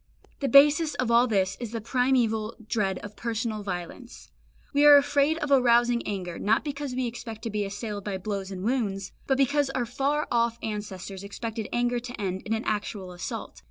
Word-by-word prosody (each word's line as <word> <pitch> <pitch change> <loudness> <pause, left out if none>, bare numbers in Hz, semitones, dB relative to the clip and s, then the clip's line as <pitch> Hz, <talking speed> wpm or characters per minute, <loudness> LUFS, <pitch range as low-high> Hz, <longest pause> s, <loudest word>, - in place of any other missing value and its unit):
The 275 - -1
basis 295 +3 +6
of 250 -2 -1
all 235 +2 +5
this 195 -3 +1
is 240 -2 -6
the 230 - -2
primeval 230 -2 +1
dread 195 -5 0
of 205 +1 -10
personal 225 -1 -3
violence. 190 +5 -7 0.4
We 285 +1 +4
are 295 -1 +10
afraid 285 +2 +2
of 300 -3 -3
arousing 240 -2 +4
anger, 180 -4 -4
not 215 +2 +2
because 285 -3 -4
we 255 0 0
expect 230 -2 -7
to 230 - -3
be 210 0 -1
assailed 205 0 -5
by 195 -2 -3
blows 195 0 -4
and 190 -1 -6
wounds, 205 -5 -1 0.2
but 270 - +2
because 275 +1 +2
our 260 -2 -1
far 280 +5 -1
off 235 -1 +2
ancestors 200 -3 -5
expected 220 +1 -5
anger 245 0 +1
to 245 0 -8
end 190 -2 -2
in 220 - 0
an 220 - -3
actual 205 -3 -3
assault. 175 - -6
230 Hz, 190 wpm, -27 LUFS, 205-255 Hz, 0.4 s, are